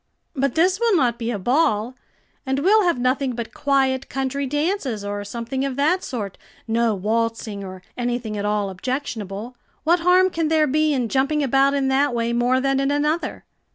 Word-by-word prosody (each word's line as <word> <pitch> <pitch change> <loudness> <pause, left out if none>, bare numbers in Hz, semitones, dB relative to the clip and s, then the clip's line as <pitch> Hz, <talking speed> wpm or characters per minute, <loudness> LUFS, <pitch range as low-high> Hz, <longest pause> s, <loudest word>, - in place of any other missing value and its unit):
"But 275 -2 0
this 365 +4 +3
will 460 -5 +3
not 245 -5 +1
be 230 0 -2
a 235 - -1
ball, 235 - +1 0.5
and 265 -1 -1
we'll 395 +8 +4
have 345 -6 +2
nothing 255 +1 0
but 235 -1 -5
quiet 270 -2 +1
country 270 +1 -2
dances, 290 - -1
or 205 0 -3
something 235 +5 -4
of 275 -2 -2
that 315 +7 +2
sort, 210 -7 -5 0.3
no 230 -1 +1
waltzing 220 0 -2
or 185 -1 -9
anything 240 -3 -2
at 205 - -3
all 205 -1 0
objectionable. 225 0 -4 0.3
What 340 +3 +3
harm 365 +2 +4
can 330 -2 -1
there 315 -1 +3
be 305 +2 +2
in 255 -5 0
jumping 275 +5 +1
about 275 +1 +3
in 275 -1 +1
that 270 -1 +2
way 235 0 0
more 245 +2 +2
than 270 0 +1
in 275 0 +1
another?" 300 +3 -1
260 Hz, 185 wpm, -22 LUFS, 230-290 Hz, 0.5 s, we'll